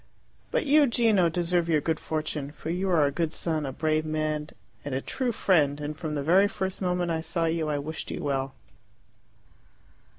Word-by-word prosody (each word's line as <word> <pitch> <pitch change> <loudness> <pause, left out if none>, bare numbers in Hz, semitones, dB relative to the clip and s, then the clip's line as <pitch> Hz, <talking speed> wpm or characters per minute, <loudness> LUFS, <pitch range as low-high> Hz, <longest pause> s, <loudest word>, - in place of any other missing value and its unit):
"But - - 0
you, 295 0 +5
Gino, 220 -7 +3
deserve 175 0 0
your 155 -2 +4
good 155 +1 -1
fortune, 155 -2 -3
for 160 - -5
you 185 +2 -1
are 165 -5 +4
a 140 - +1
good 160 +2 -1
son, 155 -4 -1
a - - -3
brave 155 +3 0
man, 155 -1 -2 0.4
and 145 -2 -3
a - - +1
true 255 - -2
friend, 150 -9 +2
and 150 +1 -4
from 155 -1 -4
the 145 - -2
very 185 +7 +5
first 190 -1 -4
moment 180 -2 0
I 160 -1 -1
saw 165 +1 -1
you 160 -1 0
I 150 - 0
wished 155 +3 -5
you - - -5
well." 135 -1 -2
160 Hz, 195 wpm, -27 LUFS, 150-180 Hz, 0.4 s, you